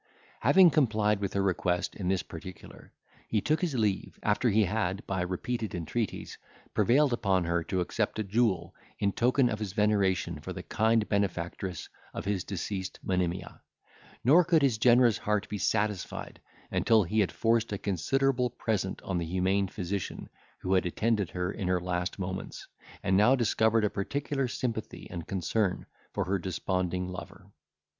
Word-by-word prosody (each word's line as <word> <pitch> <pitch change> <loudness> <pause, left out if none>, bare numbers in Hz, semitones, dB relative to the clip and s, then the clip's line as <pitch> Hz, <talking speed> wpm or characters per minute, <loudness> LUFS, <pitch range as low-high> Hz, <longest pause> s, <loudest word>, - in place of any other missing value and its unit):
Having 185 -3 +6
complied 110 -8 +2
with 100 -2 -3
her 100 - +1
request 90 -2 0
in 95 - -4
this 95 -1 +1
particular, 85 +2 -11 0.4
he 110 - +1
took 155 +8 0
his 170 -7 -1
leave, 105 -5 -1
after 105 +4 +2
he 110 +1 +4
had, 100 -1 -1
by 95 -2 -2
repeated 100 +4 -3
entreaties, 90 +6 -3 0.3
prevailed 135 +2 +3
upon 95 -6 +1
her 85 0 0
to 95 -1 -1
accept 90 - -1
a 110 - 0
jewel, 100 -3 0 0.2
in 100 -1 +1
token 125 +4 +3
of 105 -2 -2
his 105 -4 -4
veneration 100 -4 +1
for - - -6
the - - -7
kind 110 0 +2
benefactress 95 -3 -2 0.3
of - - -4
the 100 -1 0
deceased 95 +1 -4
Monimia; 90 -1 -2 0.6
nor 155 +9 +6
could 165 -3 +3
his 125 -6 +2
generous 120 -1 +5
heart 105 -1 0
be 105 - -4
satisfied, 105 0 -2 0.3
until 110 -2 +4
he 105 +5 0
had 100 - +2
forced 115 0 +1
a 100 - -1
considerable 125 - +1
present 110 -5 -2
on 90 -2 -1
the 85 - -2
humane 95 +3 +1
physician 95 0 -4 0.3
who 95 - 0
had 95 -1 +3
attended 105 +1 0
her 90 +1 -2
in 100 -3 -4
her 90 0 +2
last 90 0 -2
moments, 95 0 -5 0.4
and 95 -1 +2
now 105 +7 +6
discovered 110 -2 +2
a - - +2
particular 135 +6 -2
sympathy 115 -3 -4
and 85 -3 -6
concern 95 +1 -1 0.3
for - - -1
her 95 +1 0
desponding 90 0 -2
lover. 95 +2 -9
100 Hz, 165 wpm, -29 LUFS, 95-115 Hz, 0.6 s, Having